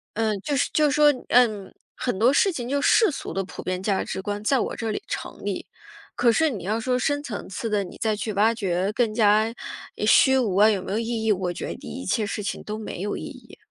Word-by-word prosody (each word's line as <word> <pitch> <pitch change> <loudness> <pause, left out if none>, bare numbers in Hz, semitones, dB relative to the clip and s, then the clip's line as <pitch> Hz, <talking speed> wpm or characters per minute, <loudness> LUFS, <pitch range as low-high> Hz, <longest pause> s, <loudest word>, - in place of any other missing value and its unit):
嗯， 215 -2 0
就 285 +6 -2
是 275 - +1
就 300 -2 +3
说， 295 0 +5 0.2
嗯， 220 -5 +3 0.2
很 245 -7 -2
多 240 +4 +5
事 385 +7 +3
情 245 -5 -5
就 280 +1 +1
世 440 - +5
俗 285 - -6
的 195 - -1
普 - - -9
遍 185 0 -2
价 195 -1 0
值 190 - -5
观 205 +1 -4
在 265 +3 +2
我 - - -2
这 225 -2 -3
里 - - -3
成 - - -6
立， - - -3 0.5
可 240 -1 +4
是 315 +4 +2
你 195 -7 -6
要 215 +3 0
说 250 +2 0
深 290 +2 0
层 215 -7 -6
次 225 +4 -4
的， 210 -2 0
你 180 - -10
再 220 -1 +1
去 215 +1 -3
挖 215 +3 +3
掘 190 -3 -1
更 230 -3 +1
加， 215 0 +4 0.5
呃， 210 - -2
虚 265 +4 +6
无 215 -8 0
啊， 210 +2 +7
有 195 -3 0
没 - - -6
有 215 - 0
意 230 -1 -2
义， 220 - +3
我 180 -2 0
觉 - - -5
得 - - -4
你 - - -8
一 - - -8
切 215 - 0
事 210 0 -4
情 - - -4
都 215 +1 -5
没 210 -4 -6
有 205 - -2
意 - - -7
义。 - - -12
220 Hz, 275 characters per minute, -24 LUFS, 200-245 Hz, 0.5 s, 啊